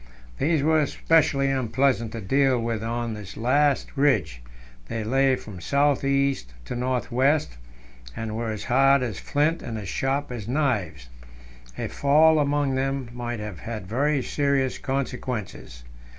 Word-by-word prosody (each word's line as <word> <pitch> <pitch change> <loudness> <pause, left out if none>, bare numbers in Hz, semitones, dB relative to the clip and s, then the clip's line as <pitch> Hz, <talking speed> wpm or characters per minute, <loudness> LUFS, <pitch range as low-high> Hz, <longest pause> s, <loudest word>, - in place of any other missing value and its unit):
These 155 -2 +1
were 155 0 +3
specially 140 -4 +2
unpleasant 125 -2 0
to 115 - -5
deal 135 +4 +2
with 115 -1 -2
on 115 0 -3
this 100 -2 -9
last 140 +6 +1
ridge; 105 - +1 0.5
they 110 - -3
lay 135 +4 +3
from 100 -7 -10
south 140 - +2
east 140 - 0
to - - -5
north 125 0 -2
west, 135 - +1 0.6
and 110 -1 -4
were 115 0 -2
as 110 -2 -4
hard 135 +2 +4
as 115 -6 -4
flints 155 +3 0
and 115 -2 -5
as 100 -3 -6
sharp 135 +3 -1
as 115 -4 -6
knives. 105 - -1 0.7
A - - -3
fall 155 +3 +4
among 145 -1 +1
them 135 -1 -2
might 120 -1 -4
have 105 -3 -6
had 110 -4 -6
very 135 +6 0
serious 140 -2 0
consequences. 125 - -4
130 Hz, 150 wpm, -25 LUFS, 110-140 Hz, 0.7 s, hard